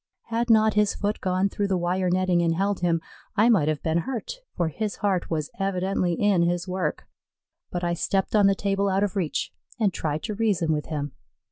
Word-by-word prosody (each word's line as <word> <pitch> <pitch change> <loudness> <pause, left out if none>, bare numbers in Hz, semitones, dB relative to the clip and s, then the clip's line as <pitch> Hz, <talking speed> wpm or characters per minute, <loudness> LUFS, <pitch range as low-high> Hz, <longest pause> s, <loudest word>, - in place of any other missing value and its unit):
Had 235 +1 -1
not 220 -1 +5
his 210 -1 +2
foot 205 +1 -2
gone 185 +1 +1
through 200 0 -2
the 190 -1 +1
wire 180 +1 0
netting 180 -1 +2
and 165 -1 +1
held 200 +2 0
him, 170 -2 +1 0.3
I 220 +3 +4
might 190 -11 +4
have 155 -1 -1
been 160 +1 +1
hurt, 265 - -4 0.2
for 170 -2 +1
his 210 +6 -3
heart 190 -4 -1
was 155 -3 -2
evidently 190 -2 0
in 200 0 +2
his 175 +1 0
work; 180 -4 -2 0.6
but 175 0 -4
I 175 0 +1
stepped 190 +4 0
on 205 -2 +6
the 195 - +3
table 200 0 0
out 195 +1 +2
of 205 0 -1
reach 180 -6 -1 0.3
and 205 -5 +2
tried 155 -1 -2
to 220 - -3
reason 195 -7 +1
with 150 -1 -3
him. 145 -2 -3
185 Hz, 210 wpm, -25 LUFS, 170-205 Hz, 0.6 s, on